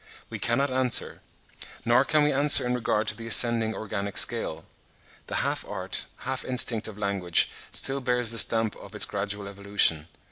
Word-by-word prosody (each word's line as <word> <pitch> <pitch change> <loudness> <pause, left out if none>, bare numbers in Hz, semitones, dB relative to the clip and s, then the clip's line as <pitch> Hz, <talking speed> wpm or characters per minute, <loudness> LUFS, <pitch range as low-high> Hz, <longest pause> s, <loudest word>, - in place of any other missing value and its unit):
We - - -6
cannot 130 +4 0
answer; 130 -2 0 0.6
nor 120 +3 +4
can 150 +2 +1
we 150 - +2
answer 140 -1 +5
in 125 - -1
regard 115 -3 -1
to 105 - -1
the 115 +1 -9
ascending 115 -1 +3
organic 100 -2 -5
scale. - - 0 0.6
The - - -5
half - - -3
art, - - +1 0.2
half 130 0 -3
instinct 120 -3 0
of 105 -2 -10
language 100 -4 +1 0.2
still 135 +1 -1
bears 125 -2 0
the 115 - +3
stamp 110 +1 +2
of - - -13
its - - +5
gradual 100 0 -4
evolution. 100 -6 0
115 Hz, 170 wpm, -25 LUFS, 100-125 Hz, 0.6 s, answer